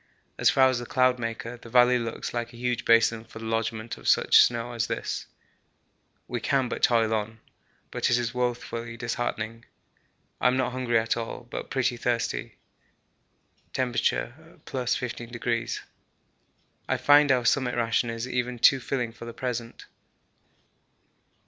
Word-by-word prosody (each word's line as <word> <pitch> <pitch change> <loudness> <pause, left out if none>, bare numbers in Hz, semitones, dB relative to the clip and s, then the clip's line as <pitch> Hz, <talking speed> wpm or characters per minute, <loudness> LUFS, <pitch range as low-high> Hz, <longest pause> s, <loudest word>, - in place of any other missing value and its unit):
As - - +5
far 130 -1 +5
as 130 -2 +1
the 120 - -7
Cloudmaker 120 -2 0
the 115 - -11
valley 125 +1 +5
looks 115 -1 -5
like 120 0 -3
a - - -12
huge 120 -1 -2
basin 115 -1 +4
for 115 - -13
the 115 - -7
lodgement 115 0 -2
of - - -9
such - - +6
snow 120 0 +1
as 115 -1 -1
this. - - -4 1.0
We 120 - -3
can 135 +1 +1
but - - -5
toil 115 -2 +3
on, 110 +1 -3 0.5
but - - 0
it 120 - +4
is 120 -1 -2
woefully 120 -1 -3
disheartening. 115 -1 -3 0.8
I - - +3
am 125 +1 +2
not 130 -1 +1
at 120 -3 +1
all 115 - -2
hungry, 120 - -13
but - - -5
pretty 130 -2 0
thirsty. 120 0 -2 1.2
(T. 130 - 0
+15°.) 120 -3 -2 1.1
I - - +2
find 145 0 +5
our 125 -2 +2
summit 130 -1 +2
ration 115 0 +1
is 115 +1 -4
even 125 -1 -2
too 130 +3 +5
filling 125 -2 -2
for 115 - -11
the 115 - -7
present. 120 -2 -5
120 Hz, 150 wpm, -26 LUFS, 115-125 Hz, 1.2 s, such